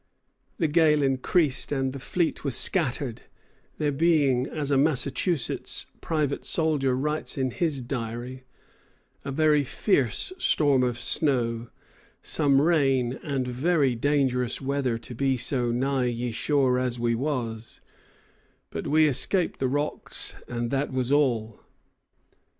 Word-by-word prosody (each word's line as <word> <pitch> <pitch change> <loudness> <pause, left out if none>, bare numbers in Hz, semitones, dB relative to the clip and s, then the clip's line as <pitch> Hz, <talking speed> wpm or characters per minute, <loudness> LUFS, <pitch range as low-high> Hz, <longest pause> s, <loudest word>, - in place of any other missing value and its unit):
] - - -50 0.2
The 165 - +1
gale 150 -1 +3
increased 135 +3 +1
and 135 -2 -1
the 140 - -6
fleet 170 +5 -1
was 140 -4 -2
scattered, 135 -8 0 0.6
there 150 -1 0
being, 140 -4 +2
as 145 -2 -3
a - - +4
Massachusetts 140 +1 +1 0.2
private 150 -4 -1
soldier 145 -6 +1
writes 150 +3 -2
in 130 -1 0
his 150 -2 -1
diary, 120 +1 -5 0.8
"a 140 - -4
very 150 0 +3
fierse 135 - 0
Storm 145 - +3
of 125 -2 0
Snow, 120 -3 0 0.5
som 140 -3 +2
Rain 135 -6 +2
and 135 -3 -2
very 140 +2 +1
Dangerous 125 -1 0
weather 135 -3 -1
to 125 +2 -10
be 135 +2 0
so 125 0 -1
nigh 130 +1 0
ye 120 0 -2
Shore 130 +1 +1
as 125 -1 -2
we 120 0 +1
was; 115 -4 -3 0.9
but - - -5
we 155 +1 +4
escaped 165 +6 0
the 130 - +1
Rocks, 145 +3 -3
and 120 -1 -3
that 140 +1 -1
was 130 0 -1
all." 120 -7 +1
135 Hz, 135 wpm, -26 LUFS, 125-150 Hz, 0.9 s, a